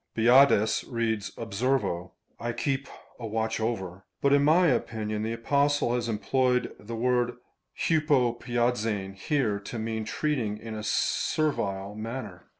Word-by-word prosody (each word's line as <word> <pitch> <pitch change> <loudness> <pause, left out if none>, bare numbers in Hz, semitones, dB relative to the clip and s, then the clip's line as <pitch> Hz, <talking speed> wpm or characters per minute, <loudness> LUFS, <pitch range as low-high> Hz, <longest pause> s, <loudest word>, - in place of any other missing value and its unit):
Budaeus 115 -2 +5
reads 110 -3 -1
Observo; 110 -5 -1 0.3
(J 120 0 -2
keep 135 +1 -1 0.3
a 115 - -5
watch 110 +1 -1
over 95 -5 -3
;) - - -55
but 140 0 +4
in 140 0 +5
my 165 +5 +5
opinion 110 -7 0
the 110 +1 -2
Apostle 140 +2 +1
has 120 -1 -1
employed 125 +3 +1
the 115 +2 -7
word 120 +1 +1 0.4
vTratTrcd^eiv^ 120 - +1
here, 105 0 0
to 100 +4 -7
mean 110 0 -2
treating 115 -3 -1
in 110 +1 -8
a 110 - -5
servile 100 -6 0
manner. 110 -4 -6
115 Hz, 135 wpm, -28 LUFS, 105-130 Hz, 0.4 s, Budaeus